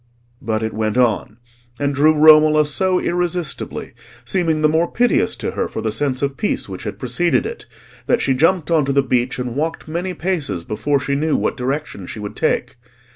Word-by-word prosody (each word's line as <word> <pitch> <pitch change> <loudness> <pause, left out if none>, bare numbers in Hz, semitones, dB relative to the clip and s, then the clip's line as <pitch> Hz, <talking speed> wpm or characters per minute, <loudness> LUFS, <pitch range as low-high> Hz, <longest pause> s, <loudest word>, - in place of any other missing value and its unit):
But 110 0 -2
it 110 - -3
went 110 +1 -1
on, 115 -3 +1 0.4
and 140 0 0
drew 155 +3 +4
Romola 155 0 +6
so 185 +5 +1
irresistibly, 175 -3 -3 0.3
seeming 165 -5 0
the - - +6
more 160 +3 +1
piteous 245 0 +2
to - - -3
her - - -2
for - - -6
the 110 - -1
sense 130 +3 -1
of 140 -1 -1
peace 210 - -1
which 95 -2 -8
had 100 -1 -5
preceded 130 +8 0
it, 465 +1 -7 0.4
that 240 - +3
she 135 - +1
jumped 165 +4 +2
on 160 -3 +4
to 140 - 0
the 140 0 +3
beach 125 -1 0
and 125 -2 -4
walked 160 +3 -3
many 175 +3 -3
paces 160 - -2
before 140 +9 -1
she 140 +1 -2
knew 150 +2 +1
what - - -1
direction 130 - -4
she 110 - -7
would 105 -1 -6
take. - - -1
145 Hz, 195 wpm, -19 LUFS, 125-165 Hz, 0.4 s, Romola